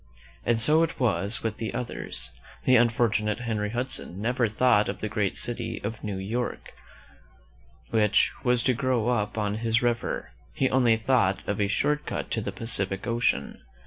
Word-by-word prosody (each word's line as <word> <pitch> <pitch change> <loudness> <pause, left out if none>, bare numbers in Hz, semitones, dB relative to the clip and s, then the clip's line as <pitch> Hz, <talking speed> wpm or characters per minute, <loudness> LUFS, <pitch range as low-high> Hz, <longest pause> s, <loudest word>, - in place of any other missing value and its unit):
And 115 -1 +2
so 150 +8 +4
it 165 - -1
was 105 -2 +1
with 110 -2 -2
the 110 - -4
others. 125 -1 -4 0.3
The 130 - +5
unfortunate 115 -2 +2
Henry 110 -4 -1
Hudson 120 -5 -4
never 120 +2 +1
thought 110 -1 +3
of - - -4
the 110 - -2
great 105 -2 -1
city 120 - -2
of 110 +2 -5
New 105 -3 -3
York, 110 +6 -4 1.2
which 105 -2 +3
was 125 -2 +2
to 130 - +3
grow 125 -2 0
up 105 -3 -1
on 105 -1 -1
his 115 +1 +1
river; 120 -2 -1 0.2
he 130 - +1
only 120 -3 +4
thought 110 -5 +1
of 100 0 -1
a 100 - +2
short 150 +8 0
cut - - -4
to 110 - 0
the 100 - -3
Pacific 95 -2 -1
Ocean. 115 -11 0
115 Hz, 170 wpm, -27 LUFS, 105-120 Hz, 1.2 s, The